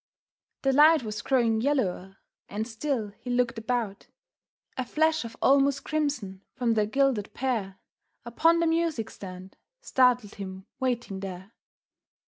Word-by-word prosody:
The 270 -1 +3
light 305 +1 +6
was 210 -1 -4
growing 230 -4 +2
yellower, 195 -9 -1 0.3
and 215 +2 -3
still 230 -2 -2
he 245 - -8
looked 245 -2 +1
about. 225 -4 -3 0.7
A 260 - -1
flash 315 +4 +1
of 230 0 -9
almost 275 0 +4
crimson 280 -12 -2
from 240 -2 +1
the 215 -2 +1
gilded 260 -3 0
pear 225 -7 -2 0.5
Upon 325 +8 +3
the - - +3
music 325 -8 0
stand, 185 0 -10 0.2
startled 250 - +2
him 190 -1 -8
waiting 240 -6 -2
there. 190 +1 -7
240 Hz, 130 wpm, -27 LUFS, 205-275 Hz, 0.7 s, light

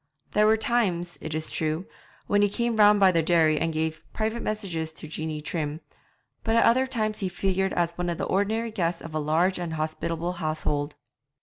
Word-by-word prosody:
There 210 0 +4
were 220 +1 +5
times, 190 -7 0
it 155 -1 -4
is 155 0 -2
true, 155 +3 -1 0.4
when 205 0 +2
he 205 - +4
came 235 +2 0
round 210 -1 +6
by 190 -1 +6
the 165 -2 +2
dairy 160 -2 +3
and 165 - 0
gave 160 0 -2
private 220 +1 -1
messages 180 -7 -3
to 160 - -6
Jeanie 155 0 -4
Trim, 155 -1 -3 0.6
but 225 0 +1
at 230 - +5
other 260 +3 +4
times 215 -5 -1
he 190 - -1
figured 190 +1 0
as 170 -1 +1
one 175 +1 -3
of 170 - -2
the - - -3
ordinary 220 +4 0
guests 175 -5 -1
of 165 - -8
a 155 - 0
large 165 +5 +1
and 170 -2 -3
hospitable 165 +2 -2
household. 155 -3 -2
175 Hz, 200 wpm, -26 LUFS, 160-210 Hz, 0.6 s, round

